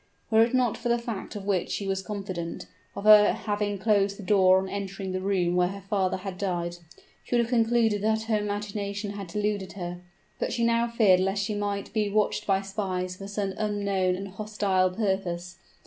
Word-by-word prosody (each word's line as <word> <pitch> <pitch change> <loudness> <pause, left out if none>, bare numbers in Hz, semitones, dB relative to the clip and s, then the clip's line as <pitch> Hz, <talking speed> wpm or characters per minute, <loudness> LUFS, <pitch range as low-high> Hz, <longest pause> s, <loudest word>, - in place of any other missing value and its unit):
Were 220 0 +6
it 230 +2 +3
not 250 -3 +2
for 240 - -3
the 235 - +3
fact, 230 -3 -6
of 200 -2 -6
which 195 -3 0
she 200 - -3
was 195 0 -1
confident, 190 -5 -5 0.3
of - - -5
her 210 -1 +8
having 205 -1 -2
closed 200 -1 +2
the 205 - -9
door 185 -1 +5
on 190 0 -1
entering 195 -1 -4
the 185 0 -2
room 185 -3 +1
where 180 0 +3
her 195 +1 -7
father 190 -3 +1
had 185 -1 -7
died, 175 -3 -2 0.5
she - - -2
would 240 - +5
have 230 - -6
concluded 225 -3 +2
that 220 +1 +1
her 220 -1 +1
imagination 205 0 -3
had 200 -2 -6
deluded 205 +1 -2
her; 175 -2 -6 0.4
but - - -1
she 235 - 0
now 235 0 +3
feared 215 -6 +4
lest 195 +2 0
she 210 - -2
might 205 -1 -3
be 215 -2 +1
watched 210 +1 0
by 195 -1 +2
spies 185 -2 -3
for 195 - -8
some 200 -1 -2
unknown 200 -3 0
and 195 +2 -5
hostile 195 -2 0
purpose. 180 -3 -2
200 Hz, 200 wpm, -27 LUFS, 190-210 Hz, 0.5 s, her